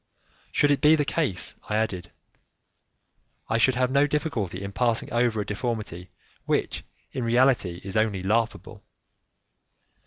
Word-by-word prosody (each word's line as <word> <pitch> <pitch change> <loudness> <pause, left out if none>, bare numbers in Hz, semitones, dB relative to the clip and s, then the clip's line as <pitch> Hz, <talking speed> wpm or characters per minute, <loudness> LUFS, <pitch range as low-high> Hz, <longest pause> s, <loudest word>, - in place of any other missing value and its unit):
"Should 145 -1 +3
it 145 - +1
be 150 +1 +6
the 150 -2 0
case," 135 - -1 0.2
I 105 - 0
added, 105 -5 -1 1.4
"I 115 - +1
should 130 +3 +4
have 125 0 +1
no 140 +2 +4
difficulty 115 - -2
in 100 - -5
passing 120 +1 0
over 120 -2 +2
a - - -4
deformity 105 -5 -4 0.4
which, - - -1 0.3
in 130 - -3
reality, 115 -7 +2
is 95 0 -6
only 110 -4 +1
laughable. 115 +3 -1
115 Hz, 135 wpm, -26 LUFS, 100-130 Hz, 1.4 s, be